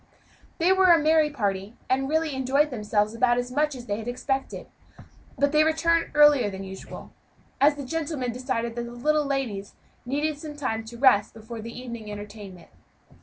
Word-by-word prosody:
They 345 +2 +3
were 380 0 +4
a 340 - +8
merry 310 0 +3
party, 205 -5 -3
and 270 +1 0
really 315 -1 0
enjoyed 270 +3 +1
themselves 210 -2 0
about 240 +1 +2
as 245 0 -2
much 300 +2 0
as 245 -2 -9
they 205 -2 -2
had 225 - -7
expected; 265 +2 -3 0.7
but 285 0 +2
they 305 0 +5
returned 330 +1 +2
earlier 295 -7 +6
than 195 0 -7
usual, 190 0 -10 0.5
as 290 +1 +5
the 285 -2 -6
gentlemen 295 -4 -2
decided 235 -1 -3
that 240 0 -3
the 235 - -8
little 300 +5 +1
ladies 245 -8 -3 0.3
needed 290 +4 -2
some 300 -1 -8
time 225 -6 -2
to 235 +1 -10
rest 240 -6 +4
before 225 +1 -8
the 230 +2 -8
evening 235 -4 -7
entertainment. 205 -3 -10
255 Hz, 175 wpm, -25 LUFS, 225-295 Hz, 0.7 s, a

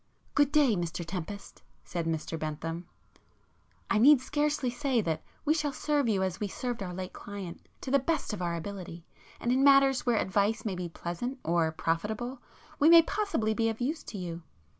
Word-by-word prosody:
"Good 290 -1 +3
day 285 -7 +4
Mr 175 -1 -3
Tempest,"—said 175 -1 -6
Mr 160 0 -2
Bentham—"I 165 +7 -6
need 280 +4 +8
scarcely 295 -1 0
say 255 0 0
that 160 -6 -1 0.2
we 305 - +4
shall 300 -2 0
serve 290 -3 0
you 195 -3 +2
as 190 0 -2
we 210 - -1
served 240 +3 -4
our 185 -2 -4
late 185 +1 -6
client, 200 -4 -8
to 260 - -5
the 280 - +5
best 305 -3 -1
of 200 - -4
our 170 -1 -1
ability. 170 -1 -7 0.3
And 240 - 0
in 260 +2 +3
matters 275 -1 +6
where 240 -3 +2
advice 205 +3 +1
may 205 - -1
be 180 -1 -4
pleasant 175 +11 -4
or 165 -1 +2
profitable, 210 +11 -2 0.4
we 300 +1 +6
may 335 0 +9
possibly 335 - 0
be 225 +1 +1
of 225 - -4
use 290 +6 -1
to 210 - -7
you. 175 -2 -5
210 Hz, 180 wpm, -30 LUFS, 175-270 Hz, 0.4 s, may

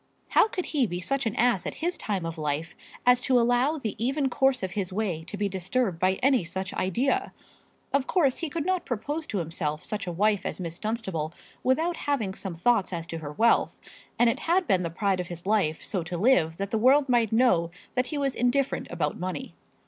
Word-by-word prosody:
How - - +5
could 365 -4 -4
he 275 -6 +1
be 175 -2 -4
such 270 +6 -1
an 220 - -2
ass 235 -5 +2
at - - -4
his 350 +2 -1
time 195 -5 -2
of 165 0 -5
life 155 +3 -2 0.3
as 250 0 +5
to 255 -1 +3
allow 245 +6 +2
the 225 -8 -3
even 270 +2 +1
course 265 -2 +2
of 185 - -2
his 190 -1 -2
way 185 -5 -2
to 205 - -7
be 205 0 0
disturbed 190 0 -1
by 185 +1 +3
any 260 -6 +4
such 190 +3 -4
idea? 265 - 0 0.6
Of 275 -1 +1
course 290 -9 +2
he 330 - -3
could 315 +1 -3
not 370 -1 0
propose 290 +7 -3
to 205 - -3
himself 155 -3 -2
such 205 -3 -3
a - - -1
wife 205 +3 +1
as - - -3
Miss 170 -1 -5
Dunstable 190 -8 -3 0.3
without 320 +7 +1
having 235 -10 -1
some 190 -3 -6
thoughts 200 +3 +2
as 170 -2 -3
to 165 -1 -6
her 150 -2 -7
wealth; 230 +9 +3 0.4
and 240 - +5
it 230 - +1
had 355 +3 +2
been 190 - +2
the 170 - -2
pride 190 +2 0
of 180 - -3
his 175 0 -8
life 195 -7 +1
so 190 - -1
to 175 +1 -5
live 170 -7 +3
that 200 0 -4
the 220 - +1
world 270 +5 +5
might 235 -4 +2
know 220 -8 +3 0.2
that 250 0 0
he 300 - -3
was 275 -2 0
indifferent 250 +3 0
about - - -2
money. 185 +9 -4
215 Hz, 220 wpm, -27 LUFS, 180-265 Hz, 0.6 s, How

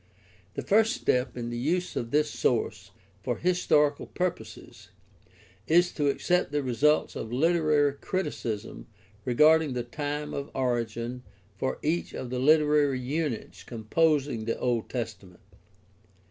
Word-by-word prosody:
The - - -3
first 220 +3 +3
step 125 - 0
in 120 -1 -4
the 120 - -3
use 175 +8 -1
of 115 - -3
this 150 +3 +1
source 105 -5 -1 0.3
for 120 +3 -2
historical 150 -5 +2
purposes 140 -12 -5 0.8
is 175 +2 +4
to 145 -2 -1
accept 180 +2 +1
the 145 -1 0
results 140 +5 +2
of 110 - -5
literary 155 0 +2
criticism 140 - -4 0.4
regarding 150 +3 +4
the 125 -1 -2
time 145 +4 -4
of 140 0 -4
origin 120 -1 -2 0.4
for 130 - -1
each 165 +3 -1
of 125 -2 -6
the 125 - -2
literary 150 -1 +4
units 135 -2 -3
composing 135 +1 0
the 115 - -1
Old 120 -3 -1
Testa 110 -6 -5
ment. 90 - -19
140 Hz, 130 wpm, -27 LUFS, 120-155 Hz, 0.8 s, is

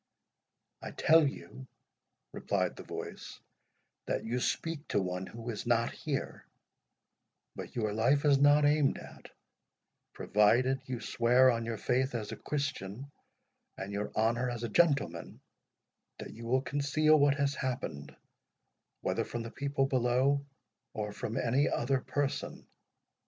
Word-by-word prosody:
"I - - -6
tell 160 -1 +4
you," 130 -1 -8 0.7
replied - - -1
the - - -9
voice, - - -8 0.7
"that - - -2
you 120 +3 -1
speak 160 +3 -2
to - - +1
one 90 0 -3
who 115 +1 -6
is 110 +1 -6
not 115 -1 +2
here; - - -4 1.1
but - - -8
your 110 -3 -1
life 135 +7 +2
is 140 -2 +5
not 145 +1 +5
aimed 145 -1 +3
at, - - -12 0.8
provided 120 +6 +2
you 125 -2 -4
swear 125 +3 +4
on 115 -1 -2
your 115 -1 -3
faith 130 +4 0
as 110 -3 -4
a - - -4
Christian, 140 -3 -4 0.7
and 95 +1 -6
your 100 +1 -3
honour 115 +3 +1
as 120 -1 -5
a 120 - -2
gentleman, 140 - +1 0.8
that - - -8
you 115 +1 -9
will 130 +2 +2
conceal 150 +2 +2
what 140 0 +4
has 140 -1 0
happened, 125 - -4 0.9
whether - - 0
from 120 -1 -5
the 115 - -7
people 140 0 -1
below, 130 +2 +2 0.5
or 105 -1 -3
from 110 +2 -4
any 130 +4 +2
other 130 +2 0
person. 145 0 -3
125 Hz, 140 wpm, -31 LUFS, 115-140 Hz, 1.1 s, is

